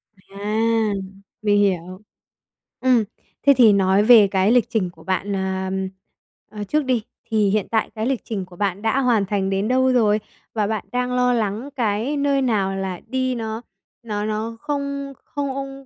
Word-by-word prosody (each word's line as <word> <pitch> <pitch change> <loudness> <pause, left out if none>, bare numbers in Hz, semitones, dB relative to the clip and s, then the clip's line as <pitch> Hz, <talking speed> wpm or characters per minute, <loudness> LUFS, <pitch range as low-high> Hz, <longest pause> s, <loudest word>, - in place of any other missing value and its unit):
À, 215 +3 -1 0.5
mình 205 -1 +3
hiểu. 185 -1 0 0.8
Ừm, 250 -3 +3 0.4
thế 280 - +7
thì 230 -5 +7
nói 195 +1 +3
về 220 -2 +8
cái 190 +2 +2
lịch 245 -2 +3
trình 220 -6 0
của 165 -2 -17
bạn, 190 +3 -1
ờ, 190 -1 -2 0.9
ờ, - - -2
trước 295 +8 0
đi, 250 -4 +1 0.3
thì 215 -2 +2
hiện 210 0 0
tại 220 -1 +1
cái 220 0 -2
lịch 260 -1 0
trình 200 -5 -4
của 180 0 -15
bạn 200 0 -1
đã 225 +4 +1
hoàn 240 -6 +2
thành 195 -1 -1
đến 195 +2 0
đâu 260 +1 +3
rồi? 215 -4 +3 0.3
Và 215 -2 0
bạn 215 -2 -3
đang 250 0 -1
lo 250 0 +3
lắng 220 +3 -2
cái 230 +4 0
nơi 280 -1 +2
nào 200 -7 +1
là 190 -2 -4
đi 255 +1 -1
nó 220 -1 -4 0.4
nó 210 -2 -3
nó 220 +2 -3
không 280 -1 -3
không 275 -1 -5
220 Hz, 175 wpm, -22 LUFS, 200-250 Hz, 0.9 s, về